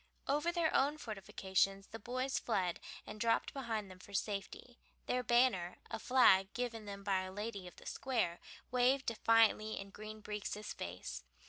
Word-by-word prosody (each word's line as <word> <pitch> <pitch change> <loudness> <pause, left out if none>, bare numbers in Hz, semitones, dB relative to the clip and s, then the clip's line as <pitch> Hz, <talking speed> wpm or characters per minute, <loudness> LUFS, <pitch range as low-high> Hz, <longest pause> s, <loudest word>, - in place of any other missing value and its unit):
Over 295 +5 +2
their 340 -2 +1
own 285 +3 +3
fortifications 195 -4 -1
the 225 - -7
boys 255 +4 -1
fled 185 -7 0 0.3
and 215 - -8
dropped 230 -1 +2
behind 225 -7 -3
them 185 - -12
for 200 +2 -10
safety. 210 +5 -3 0.3
Their 250 - +1
banner, 240 -7 +3
a - - -3
flag 195 -7 +5
given 230 -3 -3
them 200 -1 -7
by 195 -2 +2
a 185 0 -6
lady 205 -1 -5
of 175 - -11
the - - -15
Square, 230 -10 -1 0.3
waved 255 +2 +3
defiantly 225 -1 +3
in 195 0 -8
Green 215 +1 -8
Breeks' 210 0 -4
face. 65 -9 -6
215 Hz, 160 wpm, -36 LUFS, 195-245 Hz, 0.3 s, flag